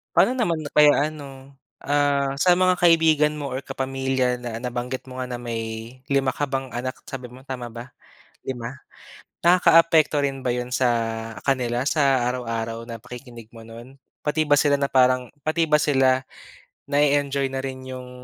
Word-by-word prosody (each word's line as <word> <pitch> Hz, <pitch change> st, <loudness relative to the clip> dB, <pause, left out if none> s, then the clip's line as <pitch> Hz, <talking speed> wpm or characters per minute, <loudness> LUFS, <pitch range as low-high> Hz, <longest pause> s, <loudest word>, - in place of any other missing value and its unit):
Paano -, -, +5 dB
naman 190 Hz, -11 st, -1 dB
kaya 150 Hz, 0 st, +5 dB
ano, 135 Hz, -2 st, -12 dB, 0.2 s
ah, 140 Hz, -1 st, +1 dB
sa 180 Hz, +4 st, +5 dB
mga 185 Hz, 0 st, +2 dB
kaibigan 160 Hz, -3 st, +4 dB
mo 145 Hz, -2 st, -5 dB
or 130 Hz, +2 st, -5 dB
kapamilya 130 Hz, -1 st, -1 dB
na 120 Hz, -1 st, -6 dB
nabanggit 125 Hz, +1 st, -4 dB
mo 130 Hz, -, -8 dB
nga 130 Hz, -, -3 dB
na 120 Hz, -1 st, -6 dB
may 115 Hz, -1 st, -3 dB, 0.5 s
5 140 Hz, -2 st, +1 dB
ka 145 Hz, +2 st, -2 dB
bang 135 Hz, -1 st, -3 dB
anak 130 Hz, +2 st, -5 dB
sabi 130 Hz, -2 st, -7 dB
mo, 125 Hz, +2 st, -14 dB
tama 130 Hz, -2 st, -6 dB
ba, 120 Hz, +2 st, -9 dB, 0.6 s
5? 125 Hz, +1 st, -5 dB, 0.6 s
Nakakaapekto 165 Hz, -3 st, +5 dB
rin 135 Hz, -2 st, -3 dB
ba 125 Hz, -, +1 dB
yun 125 Hz, 0 st, -3 dB
sa 125 Hz, -1 st, +1 dB, 0.5 s
kanila 125 Hz, -3 st, 0 dB
sa 135 Hz, -5 st, +2 dB
araw-araw 115 Hz, -2 st, -4 dB
na 115 Hz, -2 st, -8 dB
pakikinig 125 Hz, -2 st, -11 dB
mo 115 Hz, -1 st, -13 dB
nun? 120 Hz, +4 st, -12 dB, 0.2 s
Pati 155 Hz, +1 st, 0 dB
ba 145 Hz, -, +3 dB
sila 145 Hz, 0 st, +4 dB
na 140 Hz, -, 0 dB
parang 130 Hz, -1 st, +2 dB
pati 160 Hz, +3 st, +1 dB
ba 150 Hz, -1 st, +3 dB
sila 130 Hz, -3 st, +3 dB, 0.7 s
na-e-enjoy 140 Hz, -1 st, +1 dB
na 135 Hz, -, -3 dB
rin 130 Hz, -1 st, -6 dB
yung 130 Hz, -1 st, -8 dB
135 Hz, 165 wpm, -23 LUFS, 125-145 Hz, 0.7 s, Paano